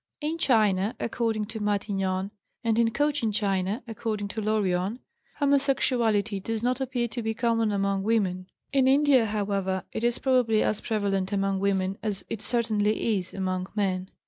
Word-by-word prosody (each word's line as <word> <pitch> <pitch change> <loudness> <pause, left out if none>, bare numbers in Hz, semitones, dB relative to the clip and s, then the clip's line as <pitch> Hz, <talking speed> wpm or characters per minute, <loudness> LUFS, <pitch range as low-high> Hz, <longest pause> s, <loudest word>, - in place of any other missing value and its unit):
In 320 +2 -3
China 210 - +2
(according 225 -2 -1
to 220 +1 -7
Matignon) 195 -2 -1 0.3
and 230 -1 +2
in 230 -1 +4
Cochin 290 -2 0
China 200 +2 -1
(according 215 -2 -3
to 220 - -4
Lorion) 205 -1 0 0.4
homosexuality 250 -7 +1
does 225 +3 -3
not 250 +2 0
appear 250 -2 -1
to 240 - -4
be 220 0 -2
common 230 -2 +1
among 195 -1 0
women. 195 -4 0 0.3
In 265 -2 +4
India, 270 -3 +5
however, 200 -3 -1
it 220 - -4
is 240 0 +2
probably 250 -5 +2
as 215 - -1
prevalent 200 -3 -1
among 195 -1 0
women 195 -1 0
as 210 -3 -3
it 220 - -3
certainly 220 -2 +1
is 185 0 -8
among 185 -1 -2
men. 190 -2 -1
215 Hz, 155 wpm, -27 LUFS, 195-235 Hz, 0.4 s, India